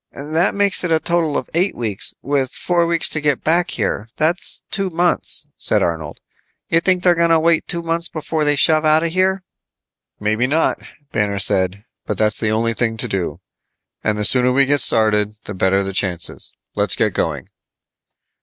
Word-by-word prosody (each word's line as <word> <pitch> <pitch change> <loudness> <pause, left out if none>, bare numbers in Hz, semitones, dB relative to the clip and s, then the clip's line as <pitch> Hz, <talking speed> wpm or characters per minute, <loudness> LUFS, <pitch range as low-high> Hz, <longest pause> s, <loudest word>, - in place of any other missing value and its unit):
"That 155 +7 -1
makes 200 -2 +4
it 180 - -1
a 160 - +3
total 170 -3 0
of - - -4
eight 180 +4 +1
weeks, 110 -5 -2
with 135 -1 0
four 175 -1 0
weeks 170 -1 +1
to 155 - -2
get 150 -3 0
back 170 +2 +1
here. 110 - -2
That's 165 +4 -2
two 195 -1 0
months," 175 +1 -1
said - - +1
Arnold. 80 -3 -3 0.5
"You 165 - +3
think 180 +1 +1
they're 180 - +5
gonna 170 -1 +3
wait 165 0 +2
two 170 -1 -2
months 165 +1 -2
before 155 0 -3
they 145 0 +2
shove 155 +2 +4
out 155 +1 +3
of 170 - -1
here?" 185 +1 +1 0.8
"Maybe 110 +4 +1
not," 155 +4 +1 0.3
Banner 105 -2 0
said. 100 0 0 0.2
"But - - -2
that's 110 0 0
the 110 - +1
only 115 +2 +1
thing 115 -1 -1
to - - -2
do. 90 -3 -3 0.6
And 105 -1 0
the 105 - -1
sooner 125 +2 +3
we 135 +2 +3
get 145 0 +1
started 105 -2 +3
the 100 - -6
better 95 +1 +1
the 95 0 -5
chances. 90 -3 -2 0.2
Let's - - +1
get - - 0
going." - - -2
145 Hz, 185 wpm, -19 LUFS, 105-170 Hz, 0.8 s, they're